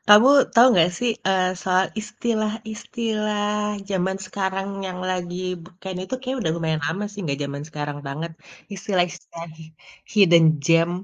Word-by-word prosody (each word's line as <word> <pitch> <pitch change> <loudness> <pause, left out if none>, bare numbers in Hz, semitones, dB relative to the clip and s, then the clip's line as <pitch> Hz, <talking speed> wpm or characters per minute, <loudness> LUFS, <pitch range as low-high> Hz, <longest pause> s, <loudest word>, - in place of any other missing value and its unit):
Kamu 210 +4 +8 0.3
tahu 240 +1 +8
nggak 175 0 +5
sih, 245 -1 +1 0.2
eee, 190 -1 +3
soal 185 0 +2
istilah-istilah 215 0 -2 0.4
zaman 190 0 0
sekarang 195 0 -2 0.2
yang 185 -1 -5
lagi 175 -1 -3 0.3
be 175 - -13
kayaknya 185 -1 -5
itu 260 - -4
kayaknya 260 +1 -3
udah 160 - 0
lumayan 160 -2 -1
lama 175 +7 -2
sih, 205 - -13
gak 140 - -2
zaman 140 0 -5
sekarang 145 -1 -5
banget. 155 +5 -4 0.4
Istilah-istilah 180 -3 -2 0.7
hidden 175 -5 +6 0.2
gem? 165 +2 +4
190 Hz, 140 wpm, -23 LUFS, 170-210 Hz, 0.7 s, Kamu